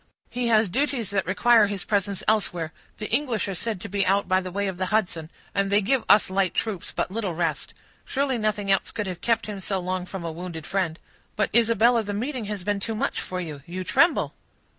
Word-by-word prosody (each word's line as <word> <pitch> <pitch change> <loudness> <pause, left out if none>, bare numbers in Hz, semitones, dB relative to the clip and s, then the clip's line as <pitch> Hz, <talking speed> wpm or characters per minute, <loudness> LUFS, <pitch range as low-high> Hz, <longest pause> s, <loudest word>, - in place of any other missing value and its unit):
"He 245 -1 -1
has 220 -2 +4
duties 250 0 0
that 195 -4 0
require 215 +3 +5
his 200 -2 -3
presence 200 -2 -1
elsewhere; 180 -7 +1 0.2
the 215 - -4
English 240 -5 +1
are 195 - -2
said 210 +2 -3
to - - -5
be 200 0 0
out 195 +2 +2
by 185 0 +3
the 185 - -5
way 200 +2 -1
of 190 -2 -3
the 185 - 0
Hudson, 180 -6 0 0.2
and 200 0 +1
they 205 - +5
give 240 +5 +1
us 205 -2 +6
light 190 -2 +1
troops 210 -6 -2
but - - -2
little 200 -5 -2
rest. 165 -2 -2 0.3
Surely 270 -3 0
nothing 210 -2 0
else 195 - +2
could 210 - -3
have 180 -2 -5
kept 230 -1 +1
him 210 -2 -5
so 195 0 -1
long 185 0 -3
from 185 -3 -6
a 165 - -2
wounded 165 -1 -7
friend. 175 -4 -1 0.4
But, 210 -1 +1
Isabella, 230 +1 +4
the 205 -1 -4
meeting 250 +1 -3
has 205 -3 -4
been 205 +1 0
too 225 +3 -3
much - - -1
for 185 - -4
you; 155 -5 -6
you 185 +2 -4
tremble." 335 - +3
200 Hz, 225 wpm, -25 LUFS, 185-220 Hz, 0.4 s, us